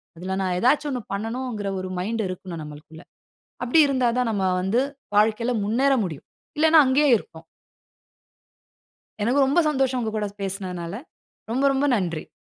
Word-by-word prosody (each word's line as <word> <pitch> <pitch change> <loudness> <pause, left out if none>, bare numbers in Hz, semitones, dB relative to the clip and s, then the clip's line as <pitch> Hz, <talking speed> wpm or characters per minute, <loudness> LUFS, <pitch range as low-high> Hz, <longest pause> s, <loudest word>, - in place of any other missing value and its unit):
அதில 185 +3 -4
நான் 185 -1 -1
ஏதாச்சு 290 +7 +2
ஒண்ணு 255 -3 -3
பண்ணணுங்கற 225 0 -4
ஒரு 185 0 -5
மைண்ட் 220 +5 -2
இருக்கணும் 185 -2 -7
நம்மளுக்குள்ள. 150 +2 -11 0.6
அப்படி 250 +6 +3
இருந்தா 260 -3 +1
தான் 250 -2 +1
நம்ம 200 -3 -1 0.2
வந்து 200 +7 +1 0.3
வாழ்க்கையில 220 +3 +2
முன்னேற 255 +7 +2
முடியும். 160 -7 -6 0.3
இல்லைனா 320 +1 +6
அங்கயே 280 +3 +3
இருப்போம். 160 -5 -13 1.8
எனக்கு 260 +6 +3
ரொம்ப 275 +6 +1
சந்தோஷம் 265 -3 +1
உங்க 225 -2 -2
கூட 210 - -1 0.2
பேசினதுனால 185 -3 -4 0.6
ரொம்ப, 265 +4 +1
ரொம்ப 270 +1 +1
நன்றி. 170 -5 -3
220 Hz, 140 wpm, -24 LUFS, 185-260 Hz, 1.8 s, இல்லைனா